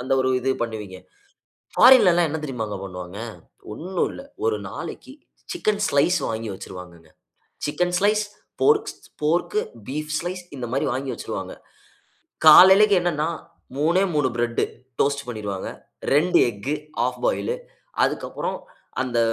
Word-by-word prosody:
அந்த 130 Hz, +1 st, -2 dB
ஒரு 130 Hz, 0 st, +1 dB
இது 135 Hz, -, 0 dB
பண்ணுவீங்க. 105 Hz, -5 st, -5 dB, 0.8 s
ஃபாரின்ல 245 Hz, -7 st, +8 dB
எல்லாம் 170 Hz, -2 st, +3 dB
என்ன 160 Hz, 0 st, -3 dB
தெரியுமாங்க 115 Hz, -7 st, -4 dB
பண்ணுவாங்க. 90 Hz, 0 st, -8 dB, 0.6 s
ஒன்னும் 180 Hz, +5 st, -2 dB
இல்லை. 275 Hz, -, -10 dB, 0.2 s
1 440 Hz, -1 st, +1 dB
நாளைக்கு 265 Hz, +1 st, -8 dB, 0.4 s
சிக்கன் 210 Hz, -11 st, 0 dB
ஸ்லைஸ் 170 Hz, +6 st, +3 dB
வாங்கி 110 Hz, -1 st, -3 dB
வச்சிருவாங்கங்க. 90 Hz, -4 st, -11 dB, 0.6 s
சிக்கன் 175 Hz, +4 st, -1 dB
ஸ்லைஸ், 210 Hz, +1 st, +2 dB, 0.4 s
போர்க்ஸ் 430 Hz, -1 st, +3 dB, 0.3 s
போர்க்கு, 175 Hz, -, +1 dB, 0.3 s
பீஃப் 150 Hz, +2 st, -4 dB
ஸ்லைஸ் 180 Hz, +1 st, -5 dB
இந்த 125 Hz, -2 st, -4 dB
மாதிரி 135 Hz, -, 0 dB
வாங்கி 130 Hz, +1 st, -3 dB
வச்சிருவாங்க. -, -, -6 dB, 0.9 s
காலைலைக்கு 190 Hz, +5 st, +9 dB
என்னன்னா, 160 Hz, -3 st, 0 dB, 0.5 s
3ஏ 170 Hz, +6 st, +3 dB
3 145 Hz, -3 st, +3 dB
பிரெட்டு 120 Hz, 0 st, 0 dB, 0.4 s
டோஸ்ட் 140 Hz, 0 st, 0 dB
பண்ணிருவாங்க. 105 Hz, -5 st, -4 dB, 0.4 s
2 165 Hz, +5 st, +4 dB
எக்கு 110 Hz, +8 st, -4 dB, 0.3 s
ஹால்ஃப் -, -, 0 dB
பாயிலு. -, -, 0 dB, 0.5 s
அதுக்கு -, -, 0 dB
அப்புறம் -, -, -3 dB, 0.4 s
அந்த 120 Hz, -2 st, -1 dB
150 Hz, 125 wpm, -23 LUFS, 115-185 Hz, 0.9 s, காலைலைக்கு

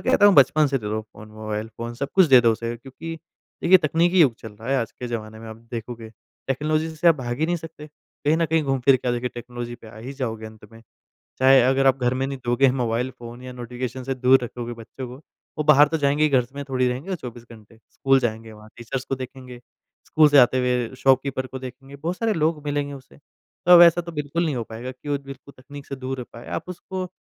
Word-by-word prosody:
कहता 205 Hz, -, +6 dB
हूँ 200 Hz, -, +6 dB
बचपन 145 Hz, +3 st, +5 dB
से 135 Hz, -1 st, 0 dB
दे 105 Hz, -, -8 dB
दो 110 Hz, +1 st, -2 dB
फ़ोन 110 Hz, 0 st, -15 dB
मोबाइल 110 Hz, 0 st, -5 dB
फ़ोन 115 Hz, 0 st, -5 dB
सब 140 Hz, +3 st, -4 dB
कुछ 190 Hz, -2 st, +6 dB
दे 130 Hz, -4 st, +7 dB
दो 115 Hz, -1 st, +4 dB
उसे 115 Hz, +1 st, -4 dB
क्योंकि 135 Hz, +7 st, -8 dB, 0.5 s
देखिए 185 Hz, +2 st, +7 dB
तकनीकी 170 Hz, +3 st, +2 dB
युग 130 Hz, -7 st, +5 dB
चल 110 Hz, -, -10 dB
रहा 110 Hz, +4 st, -11 dB
है 135 Hz, -, +3 dB
आज 115 Hz, -, -3 dB
के 125 Hz, -, -7 dB
ज़माने 110 Hz, -2 st, -6 dB
में 115 Hz, -, -10 dB
आप 110 Hz, -, -9 dB
देखोगे। 115 Hz, -1 st, -6 dB, 0.4 s
टेक्नोलॉजी 155 Hz, +4 st, -1 dB
से 170 Hz, +2 st, +4 dB
आप 165 Hz, -, +6 dB
भाग 120 Hz, -3 st, -5 dB
ही 160 Hz, -, +2 dB
नहीं 175 Hz, 0 st, 0 dB
सकते। 160 Hz, -2 st, -10 dB
कहीं 150 Hz, +1 st, -3 dB
न 165 Hz, -, +1 dB
कहीं 160 Hz, 0 st, +1 dB
घूम-फिर 135 Hz, -1 st, +3 dB
के 125 Hz, -, -4 dB
आके -, -, +2 dB
देखिए 120 Hz, +1 st, -2 dB
टेक्नोलॉजी 120 Hz, 0 st, -7 dB
पे 120 Hz, -2 st, -15 dB
आ 110 Hz, -, -14 dB
ही 130 Hz, +5 st, -7 dB
जाओगे 115 Hz, -5 st, -4 dB
अंत 110 Hz, 0 st, -14 dB
में। 115 Hz, -, -14 dB, 0.6 s
चाहे 130 Hz, +1 st, +6 dB
अगर 135 Hz, +2 st, +2 dB
आप 135 Hz, 0 st, +4 dB
घर 125 Hz, +1 st, +2 dB
में 130 Hz, +1 st, -1 dB
नहीं 135 Hz, 0 st, -5 dB
दोगे 125 Hz, +2 st, +3 dB
मोबाइल 125 Hz, 0 st, -1 dB
फ़ोन 120 Hz, +1 st, -10 dB
या 130 Hz, -, -8 dB
नोटिफिकेशन 125 Hz, +1 st, -6 dB
से 135 Hz, -, -2 dB
दूर 130 Hz, 0 st, +4 dB
रखोगे 120 Hz, 0 st, -6 dB
बच्चों 115 Hz, +3 st, -9 dB
को, 125 Hz, -, -9 dB, 0.4 s
वो 155 Hz, -, 0 dB
बाहर 150 Hz, -1 st, +6 dB
तो 160 Hz, -, -1 dB
जाएँगे 145 Hz, +1 st, +1 dB
ही 155 Hz, -, +5 dB
घर 130 Hz, -4 st, +2 dB
में 140 Hz, -, -5 dB
थोड़ी 130 Hz, -1 st, +1 dB
रहेंगे 145 Hz, +10 st, -3 dB
24 120 Hz, -4 st, -9 dB
घंटे। 110 Hz, 0 st, -16 dB
स्कूल 135 Hz, 0 st, +3 dB
जाएँगे 110 Hz, -2 st, -3 dB
वहाँ 105 Hz, 0 st, -14 dB
टीचर्स 120 Hz, +3 st, -5 dB
को 135 Hz, -, -2 dB
देखेंगे। 130 Hz, -1 st, -9 dB, 0.5 s
स्कूल 155 Hz, -1 st, +5 dB
से 145 Hz, -1 st, +5 dB
आते 130 Hz, 0 st, +5 dB
हुए 125 Hz, -1 st, 0 dB
शॉपकीपर 130 Hz, 0 st, +2 dB
को 130 Hz, -, -7 dB
देखेंगे, 135 Hz, +2 st, -10 dB
बहुत 170 Hz, +5 st, -3 dB
सारे 225 Hz, -1 st, 0 dB
लोग 155 Hz, -1 st, 0 dB
मिलेंगे 145 Hz, -1 st, -2 dB
उसे। 135 Hz, +1 st, -15 dB, 0.5 s
तो 175 Hz, -1 st, +9 dB
ऐसा 170 Hz, 0 st, +6 dB
तो 170 Hz, -1 st, -8 dB
बिल्कुल 150 Hz, +3 st, -2 dB
नहीं 150 Hz, -5 st, -1 dB
हो 115 Hz, -, -3 dB
पाएगा 115 Hz, +3 st, -7 dB
कि 130 Hz, +3 st, -12 dB
वो 145 Hz, -1 st, 0 dB
बिल्कुल 135 Hz, +1 st, -11 dB
तकनीक 140 Hz, +1 st, -11 dB
से 135 Hz, -, -6 dB
दूर 130 Hz, 0 st, -5 dB
हो 125 Hz, -, -5 dB
पाए। 115 Hz, -, -11 dB
आप -, -, -17 dB
उसको 185 Hz, +1 st, -6 dB
130 Hz, 240 wpm, -23 LUFS, 120-145 Hz, 0.6 s, तो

